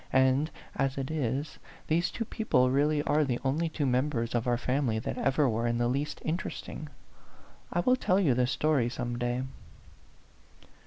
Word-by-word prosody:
And 130 Hz, +3 st, +4 dB, 0.3 s
as 135 Hz, 0 st, 0 dB
it 135 Hz, +1 st, -3 dB
is, 140 Hz, -1 st, -2 dB, 0.3 s
these 170 Hz, +3 st, +1 dB
two 230 Hz, -, -4 dB
people 130 Hz, -, +2 dB
really 145 Hz, +2 st, +2 dB
are 150 Hz, +1 st, +2 dB
the 125 Hz, -4 st, 0 dB
only 155 Hz, +5 st, 0 dB
two 155 Hz, -2 st, -2 dB
members 125 Hz, -2 st, 0 dB
of 120 Hz, 0 st, 0 dB
our 120 Hz, -1 st, +2 dB
family 125 Hz, -2 st, 0 dB
that 110 Hz, -, -3 dB
ever 135 Hz, +1 st, +2 dB
were 115 Hz, 0 st, 0 dB
in 120 Hz, 0 st, 0 dB
the 120 Hz, 0 st, +1 dB
least 140 Hz, +5 st, -2 dB
interesting. 155 Hz, -2 st, -4 dB, 0.8 s
I 175 Hz, -, +1 dB
will 250 Hz, +8 st, +4 dB
tell 190 Hz, -6 st, +2 dB
you 160 Hz, -10 st, +3 dB
the 125 Hz, 0 st, +2 dB
story 140 Hz, -3 st, +1 dB
some 120 Hz, -1 st, -4 dB
day." 120 Hz, +1 st, -1 dB
135 Hz, 170 wpm, -29 LUFS, 125-155 Hz, 0.8 s, And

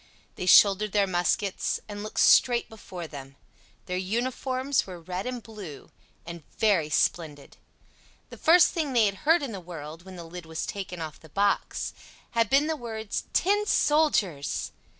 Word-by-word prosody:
They 180 Hz, -, -6 dB
shouldered 200 Hz, +2 st, +6 dB
their 205 Hz, -1 st, +3 dB
muskets, 185 Hz, +2 st, 0 dB
and 205 Hz, -1 st, -7 dB
looked 215 Hz, -, -5 dB
straight 240 Hz, -2 st, +5 dB
before 185 Hz, -5 st, -9 dB
them; 135 Hz, -3 st, -10 dB, 0.5 s
their 180 Hz, -, -3 dB
uniform 255 Hz, +6 st, -2 dB
was 280 Hz, -, +2 dB
red 180 Hz, +3 st, -6 dB
and 250 Hz, -2 st, -5 dB
blue, 195 Hz, -9 st, -10 dB, 0.3 s
and 170 Hz, 0 st, -8 dB, 0.2 s
very 195 Hz, -9 st, +2 dB
splendid. 150 Hz, -1 st, -1 dB, 0.7 s
The -, -, -10 dB
first 340 Hz, +2 st, +6 dB
thing 305 Hz, -5 st, -2 dB
they 235 Hz, -3 st, +4 dB
had 200 Hz, -1 st, 0 dB
heard 325 Hz, -2 st, +5 dB
in 270 Hz, -, -4 dB
the 200 Hz, -, -6 dB
world, 165 Hz, -1 st, -9 dB
when 190 Hz, 0 st, -11 dB
the 175 Hz, -, -8 dB
lid 165 Hz, 0 st, -10 dB
was 160 Hz, 0 st, -4 dB
taken 185 Hz, -3 st, -6 dB
off 155 Hz, -1 st, -7 dB
the 160 Hz, -, -16 dB
box, 200 Hz, +5 st, -1 dB, 0.4 s
had 230 Hz, -2 st, +1 dB
been 275 Hz, +2 st, +4 dB
the 320 Hz, 0 st, -1 dB
words 220 Hz, -5 st, -5 dB
"Tin 410 Hz, +3 st, +2 dB
soldiers!" 290 Hz, -, +1 dB
200 Hz, 165 wpm, -27 LUFS, 170-240 Hz, 0.7 s, shouldered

